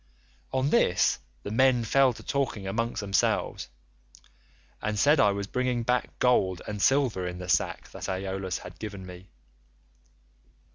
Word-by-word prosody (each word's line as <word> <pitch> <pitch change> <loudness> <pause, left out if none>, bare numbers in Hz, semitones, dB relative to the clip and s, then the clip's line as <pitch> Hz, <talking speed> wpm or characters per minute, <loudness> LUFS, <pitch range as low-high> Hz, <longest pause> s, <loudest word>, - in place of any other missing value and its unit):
On 130 +2 0
this - - +3 0.2
the 100 - -5
men 125 +1 +3
fell 135 +4 +4
to - - -12
talking 130 -8 -2
among 115 +5 -1
themselves, 100 -2 0 1.1
and 105 0 -2
said 145 +7 +4
I 105 - +5
was 100 0 -3
bringing 125 +2 -1
back 125 +1 -1
gold 95 -8 +2
and 105 -1 -4
silver 125 -10 +2
in 90 0 -5
the 90 0 -7
sack 80 -3 0
that - - -6
Aeolus 95 -1 -3
had 90 - -11
given 100 -3 -7
me. 90 +1 -11
105 Hz, 145 wpm, -27 LUFS, 95-125 Hz, 1.1 s, I